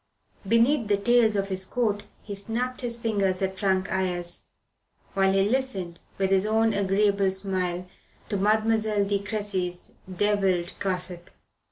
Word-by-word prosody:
Beneath 230 +3 +3
the 205 -1 +3
tails 230 +1 +3
of 195 0 -1
his 190 0 0
coat 210 0 0 0.2
he 205 - -6
snapped 230 +5 -3
his 235 -2 -3
fingers 200 -5 0
at 190 0 -2
Frank 190 -2 +1
Ayres, 175 -2 -1 0.7
while 195 0 +3
he 195 0 +3
listened, 210 -9 -2 0.2
with 195 0 0
his 190 -1 +4
own 225 +1 +2
agreeable 200 0 +2
smile, 185 -2 -2 0.4
to 210 - -2
Mademoiselle 215 0 +2
de 200 0 0
Cressy's 200 -4 -2
devilled 190 -2 +1
gossip. 180 -2 -3
200 Hz, 140 wpm, -26 LUFS, 190-220 Hz, 0.7 s, his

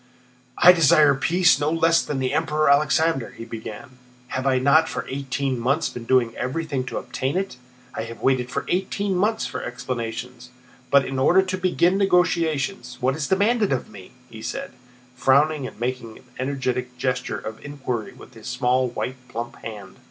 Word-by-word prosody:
"I 180 - +9
desire 155 -4 +5
peace, 175 +6 +3
no 145 0 +1
less 165 +1 +3
than 145 - -4
the 130 0 -1
Emperor 155 -1 +2
Alexander," 150 -2 +2
he 115 - -7
began. 115 +3 -9 0.3
"Have 130 +1 -2
I 130 -1 +3
not 140 +5 +4
for - - -4
eighteen 135 -1 -2
months 140 +7 +1
been 120 -1 -8
doing 120 -2 +2
everything 140 0 -2
to - - -5
obtain 130 +5 -2
it? 190 -9 -3 0.4
I - - -4
have 115 0 -9
waited 130 -2 +1 0.2
eighteen 195 +2 -1
months 210 +5 +1
for - - -5
explanations. 120 0 -5 0.4
But 140 -1 +5
in 135 0 -3
order 180 +8 +5
to 185 0 -3
begin 185 0 +2
negotiations, 160 -9 +1
what 130 +2 +1
is 150 -2 -3
demanded 210 +3 +2
of 130 - -2
me?" 95 -3 -13
he 110 -1 -11
said, - - -5 0.4
frowning 140 +2 +3
and - - -12
making 120 -2 -4
an - - -18 0.2
energetic 125 -2 -2
gesture 125 0 -2
of 110 0 -8
inquiry 130 -6 -4
with - - -15
his - - -11
small 125 +1 +1
white 125 +1 -4
plump 120 -1 -6
hand. 105 -4 -9
135 Hz, 170 wpm, -23 LUFS, 125-160 Hz, 0.4 s, I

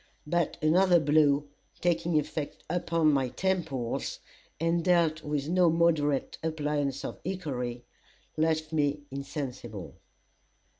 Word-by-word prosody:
But 170 +1 0
another 175 +3 +5
blow, 145 -1 +3 0.3
taking 170 -1 +1
effect 150 0 -5
upon 165 -3 +2
my 135 -2 +1
temples, 160 -9 -2 0.4
and 165 +1 +1
dealt 170 -3 +3
with 150 -1 -2
no 180 +1 +4
moderate 160 -4 +1
appliance 150 -3 -1
of - - -6
hickory, 130 -10 -3 0.5
left 155 0 0
me 145 -1 +1
insensible. 130 - -6
155 Hz, 105 wpm, -29 LUFS, 140-170 Hz, 0.5 s, another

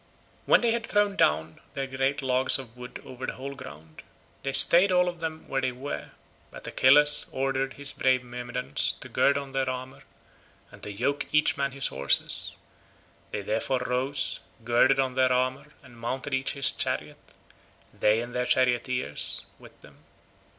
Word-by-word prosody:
When - - +5
they 235 -1 +2
had 235 0 -1
thrown 205 -1 +1
down 80 - +1
their 135 -1 -2
great 135 +2 -1
logs 130 0 +3
of 125 -4 -10
wood 125 0 -9
over 130 0 -7
the - - -3
whole 135 +2 -7
ground, 80 - -12 0.4
they 135 - -3
stayed 175 +7 +5
all 180 0 +3
of 175 -1 -4
them 160 -1 -6
where 135 - -1
they 130 -1 0
were, 125 - -6 0.4
but - - -12
Achilles 145 +3 +5
ordered 135 0 -1
his 140 0 -2
brave 130 -1 +1
Myrmidons 125 -5 -2
to - - -11
gird 140 - +2
on 140 -1 -6
their 135 -1 -1
armour, 130 +1 -6 0.7
and - - -15
to 105 - -7
yoke 125 +8 -2
each 150 0 +3
man 140 -1 -1
his 135 +1 +3
horses; 70 +1 +1 0.7
they 105 - -5
therefore 120 +5 -1
rose, 130 +3 -1 0.2
girded 120 +3 +3
on 130 -1 0
their 130 0 +2
armour 130 +3 0 0.2
and 120 -3 -16
mounted 130 +4 -4
each 135 0 -1
his 140 -1 +6
chariot—they 110 +2 -3
and 120 0 -8
their 125 0 -1
charioteers 125 - 0
with - - -17
them. - - -18
130 Hz, 165 wpm, -27 LUFS, 125-140 Hz, 0.7 s, his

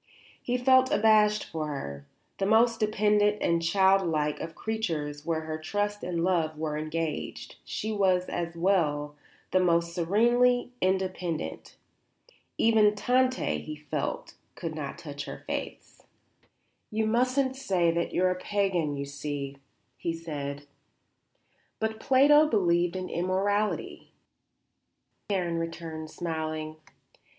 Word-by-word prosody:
He 250 0 -1
felt 260 +1 +5
abashed 210 -1 +4
before 155 -1 -4
her. 70 - -6 0.3
The 195 - +1
most 230 +2 +4
dependent 210 -1 +2
and 170 0 +1
child 190 +3 +4
like 150 -3 0
of 160 - -6
creatures 160 -10 -3
where 160 -1 0
her 155 0 -5
trust 205 +5 -2
and 170 -2 -1
love 165 -4 +1
were 155 -1 -2
engaged, 155 0 -4
she 220 - -4
was, 190 -3 +2
as 170 -1 -4
well, 150 -5 +1 0.4
the 185 - +4
most 170 -1 +2
serenely 240 +8 +3
independent. 185 -3 -2 0.8
Even 215 -2 +4
Tante, 255 +4 +1
he 155 - -7
felt, 150 -1 -4 0.2
could 165 -1 -5
not 145 -3 -5
touch 145 -2 -7
her - - -8
faiths. - - -6 0.9
"You 220 0 0
mustn't 255 +4 +1
say 185 -10 +1
that 170 +1 -1
you 180 - +1
are 185 - +4
a 180 - -3
pagan, 185 -8 0
you 140 - -3
see," 140 -1 -5 0.4
he 170 - -2
said. 145 -3 -5 1.1
"But 220 0 -2
Plato 290 +5 +5
believed 175 - +2
in 185 0 -3
immortality," 195 +4 -1 1.2
Karen 175 -4 0
returned, 165 -1 -5
smiling. 155 -2 -4
180 Hz, 125 wpm, -28 LUFS, 155-210 Hz, 1.2 s, felt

